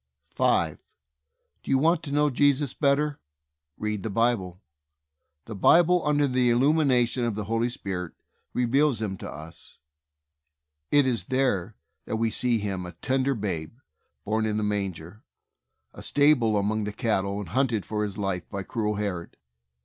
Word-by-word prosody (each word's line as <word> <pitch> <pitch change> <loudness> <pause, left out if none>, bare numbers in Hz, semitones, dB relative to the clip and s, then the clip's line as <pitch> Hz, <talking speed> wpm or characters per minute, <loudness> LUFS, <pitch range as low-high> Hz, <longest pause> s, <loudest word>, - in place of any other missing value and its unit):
5. - - +1 0.8
Do - - -11
you 135 - +4
want 165 +4 +3
to 150 - -7
know 150 0 +2
Jesus 140 0 +2
better? 145 0 +1 0.6
Read 105 -1 -3
the 110 - -4
Bible. 100 -5 0 0.9
The 115 - -7
Bible, 175 - +4
under 145 -1 +2
the 125 -1 +2
il 120 - +3
lumination 130 -4 +2
of 115 - -2
the 105 - -3
Holy 115 +3 0
Spirit, 95 -7 -5 0.4
reveals 130 +1 +2
Him 105 -3 -3
to - - -7
us. 80 +3 -11 1.1
It 145 -1 +4
is 115 -8 0
there 115 -7 0 0.3
that - - -3
we 115 0 0
see 120 0 +2
Him 100 -3 -3
a 90 - -9
tender 130 +9 0
babe, 95 -4 -4 0.5
born 110 +1 0
in 105 0 -1
a - - -1
manger, 100 -2 -3 0.7
in - - -12
a - - -7
stable 140 -7 +3
among 105 +1 0
the 105 - -4
cattle, 100 -4 -1
and 100 -5 -6
hunted 120 -2 0
for 105 -1 -3
His 100 -2 -4
life 95 -4 -3
by 100 0 -4
cruel 105 +1 -2
Herod. 100 -5 -4
110 Hz, 160 wpm, -26 LUFS, 100-135 Hz, 1.1 s, you